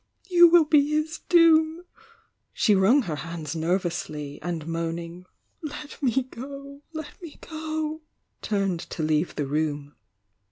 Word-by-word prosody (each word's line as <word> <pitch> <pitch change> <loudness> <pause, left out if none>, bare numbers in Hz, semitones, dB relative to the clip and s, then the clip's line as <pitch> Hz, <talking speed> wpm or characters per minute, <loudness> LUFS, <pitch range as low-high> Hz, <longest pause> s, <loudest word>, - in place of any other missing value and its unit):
— - - -30
you 345 -1 +8
will 335 -1 +6
be 295 -1 +4
his 315 +1 -1
doom! 330 0 +5 0.3
" 450 - -35 0.3
She 210 - +3
wrung 210 +9 +4
her 155 -7 -4
hands 165 -1 -6
nervously, 160 -4 -2
and 170 -3 -4
moan 165 0 -2
ing, 170 +1 -9 0.4
"Let 300 -1 -8
me 265 -1 +2
go! 275 +3 -10
— - - -46
let 315 +1 -8
me 330 -4 -10
go!" 315 0 -4 0.4
turned 195 -4 -1
to 165 - -5
leave 155 +2 0
the 145 - -1
room. 145 0 -2
225 Hz, 155 wpm, -25 LUFS, -, 0.4 s, you